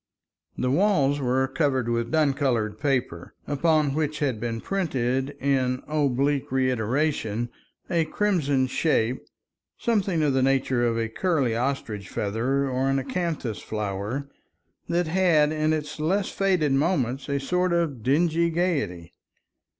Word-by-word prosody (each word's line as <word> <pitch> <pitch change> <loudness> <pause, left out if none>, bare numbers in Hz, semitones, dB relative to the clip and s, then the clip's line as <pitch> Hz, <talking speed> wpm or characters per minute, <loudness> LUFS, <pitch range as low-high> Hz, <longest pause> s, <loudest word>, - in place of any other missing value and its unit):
The 125 - 0
walls 145 -5 +2
were 130 0 +1
covered 130 -3 0
with 115 0 -1
dun 155 -3 +2
colored 115 -7 -1
paper, 125 - -2
upon 150 -1 +2
which 155 0 -1
had 135 -7 -1
been 115 0 -3
printed 135 -6 -1
in 130 -2 0
oblique 140 -2 0
reiteration 125 -2 0 0.4
a 170 -3 +1
crimson 155 -8 +1
shape, 130 -3 0 0.5
something 195 -8 +1
of 145 -2 +2
the 130 - +2
nature 130 -2 +2
of 115 -1 0
a 115 -1 0
curly 135 -2 0
ostrich 115 -6 -3
feather, 125 +7 -1
or 130 +1 0
an 135 - +2
acanthus 140 - -2
flower, 105 +6 -3 0.6
that 175 +1 +1
had 160 -3 +3
in 155 0 +1
its 155 -1 -3
less 190 +6 0
faded 185 -7 +1
moments 135 -3 0
a 140 0 0
sort 180 +6 0
of 165 -8 0
dingy 165 +6 +2
gaiety. 150 - -1
140 Hz, 135 wpm, -25 LUFS, 125-155 Hz, 0.6 s, had